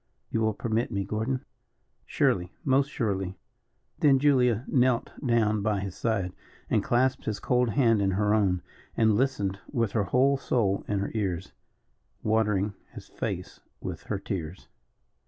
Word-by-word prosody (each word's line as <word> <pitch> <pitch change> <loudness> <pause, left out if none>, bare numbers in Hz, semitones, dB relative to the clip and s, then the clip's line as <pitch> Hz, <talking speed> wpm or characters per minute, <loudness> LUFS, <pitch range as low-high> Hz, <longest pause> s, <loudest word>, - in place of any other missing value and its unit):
You 115 - 0
will 110 -2 +1
permit 115 +1 -1
me 100 0 -1
Gordon?" 110 +6 -2 0.6
"Surely 90 0 +1
most 135 0 +3
surely." 95 -8 -2 0.6
Then 140 -3 +5
Julia 130 -4 +3
knelt 125 -2 +2
down 110 -4 +2
by 105 -1 0
his 95 -2 -4
side, 100 -6 -1 0.4
and - - +3
clasped 130 +2 +1
his 110 -2 -2
cold 125 -1 +2
hand 115 -3 +3
in 100 - +2
her 105 0 +2
own, 95 -4 +2 0.3
and 110 -1 +4
listened 105 -6 0
with 115 -6 0
her 105 -3 +1
whole 135 +7 +3
soul 105 -7 0
in 105 - 0
her 100 - -3
ears, 95 -5 -2 0.7
watering 105 -2 +1 0.2
his - - -10
face - - -5 0.2
with - - -5
her - - -2
tears. 90 -1 -5
110 Hz, 150 wpm, -27 LUFS, 100-125 Hz, 0.7 s, Then